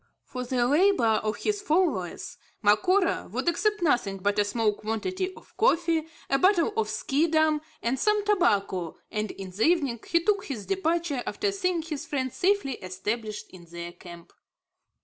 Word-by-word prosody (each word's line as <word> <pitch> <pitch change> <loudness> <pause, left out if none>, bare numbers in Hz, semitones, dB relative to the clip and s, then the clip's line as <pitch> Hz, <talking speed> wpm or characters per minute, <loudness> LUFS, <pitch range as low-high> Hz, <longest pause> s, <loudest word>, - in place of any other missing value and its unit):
For 250 -1 -6
the 245 -1 0
labour 280 - +3
of 215 0 -1
his 415 - -2
followers 310 - -1 0.2
Macora 365 - +3
would - - -3
accept 420 +3 +1
nothing 240 - +1
but 205 +2 0
a - - +5
small 210 +1 +1
quantity 225 - -3
of - - -17
coffee, 335 -7 +2 0.2
a 275 - +2
bottle 375 +4 +3
of 445 -1 0
Schiedam 315 +1 +2 0.2
and 245 +3 0
some 420 +2 +2
tobacco, 200 - +1
and 215 0 -2
in 190 -1 -8
the 195 +4 -8
evening 285 -9 +2
he 335 0 +2
took 400 0 +1
his 235 -8 -5
departure, 340 -7 0
after 410 -1 -1
seeing 365 -4 -1
his 310 -3 -5
friends 260 -3 -2
safely 385 - +1
established 210 +4 -4
in 180 -2 -13
their 170 +1 -7
camp. 175 -1 -13
285 Hz, 160 wpm, -27 LUFS, -, 0.2 s, a